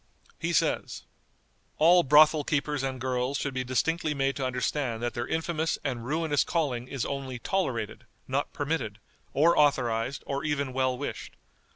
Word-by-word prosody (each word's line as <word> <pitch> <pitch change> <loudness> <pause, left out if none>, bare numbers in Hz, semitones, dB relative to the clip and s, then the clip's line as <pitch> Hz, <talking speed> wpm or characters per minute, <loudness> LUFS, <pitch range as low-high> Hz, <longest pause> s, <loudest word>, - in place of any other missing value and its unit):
He - - -1
says: - - 0 0.7
"All 175 +3 +6
brothel 150 0 +6
keepers 145 -1 -1
and 135 -1 -3
girls 130 +1 -1
should 140 0 -3
be 130 0 -1
distinctly 150 +5 0
made 135 0 0
to 135 - -2
understand 125 -1 -2
that 120 - -1
their 120 +1 -3
infamous 160 0 -1
and 125 -4 -3
ruinous 150 +2 +1
calling 135 -8 -1
is 135 -2 -3
only 135 -2 -4
tolerated, 120 - -2 0.2
not 135 +2 -1
permitted, 140 -8 -2 0.3
or 165 +5 +4
authorized, 125 -3 +1
or 140 +1 -3
even 140 -3 -1
well 130 -1 +1
wished. 145 - -6
140 Hz, 155 wpm, -28 LUFS, 125-150 Hz, 0.7 s, All